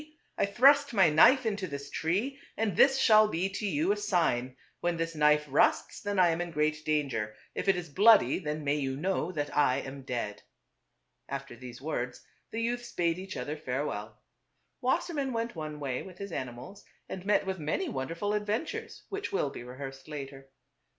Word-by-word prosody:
I - - +1
thrust 280 +5 +5
my 185 -6 +6
knife 255 - +6
into 205 -3 -1
this 140 -1 -7
tree, 210 - -1 0.2
and 215 -5 0
this 270 +5 +6
shall 215 -4 +6
be 190 -1 -1
to 205 +2 -3
you 165 +1 +1
a - - +2
sign: 135 -11 0 0.2
when 175 -1 -1
this 165 0 -2
knife 150 -1 +3
rusts 140 +1 +2
then 205 -1 -2
I 180 -2 +6
am 165 +1 0
in 175 - -3
great 155 -1 0
danger; 135 -9 -1 0.2
if - - -4
it 195 - +5
is 180 -1 -4
bloody 205 +8 +5
then 150 -3 -4
may 145 +1 +1
you 135 -2 -2
know 180 +1 -1
that 145 -4 -3
I 145 -3 +4
am 135 +1 -8
dead." 120 -5 -4 0.9
After 135 -2 -5
these 125 0 -10
words 125 -5 -3 0.3
the 225 - -4
youths 240 +1 -2
bade 170 0 0
each 190 +1 -7
other 150 - -3
farewell. 135 -6 -4 0.6
Wassermann 280 0 0
went 230 -1 -2
one 155 -2 -5
way 135 -3 -2
with 185 -2 -11
his 200 -1 -7
animals 130 +9 -6 0.2
and 185 - -6
met 205 0 +2
with 190 -1 -3
many 155 - -1
wonderful 170 - -3
adven 210 +4 0
tures 445 +7 -7
which 400 0 -4
will 145 -7 0
be - - -8
rehearsed 135 +2 -8
later. 135 -2 -8
165 Hz, 185 wpm, -30 LUFS, 140-205 Hz, 0.9 s, my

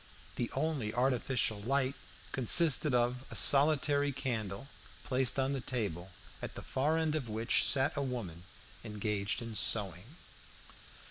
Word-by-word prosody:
The 120 - -3
only 135 -6 -2
artificial 125 -3 +1
light 135 +3 0 0.4
consisted 150 +3 +4
of 125 +1 0
a - - -9
solitary 145 0 +3
candle 120 -4 -4 0.4
placed 130 -1 +1
on 135 +1 0
the 135 - -3
table, 100 -9 -3 0.3
at - - -7
the - - -8
far 150 +5 -1
end 160 -2 0
of 140 -7 -3
which 110 +2 +2
sat 135 +3 +2
a 140 - -2
woman 105 -11 -5 0.4
engaged 105 -1 -3
in 115 -1 -7
sewing. 105 - 0
125 Hz, 135 wpm, -32 LUFS, 110-140 Hz, 0.4 s, consisted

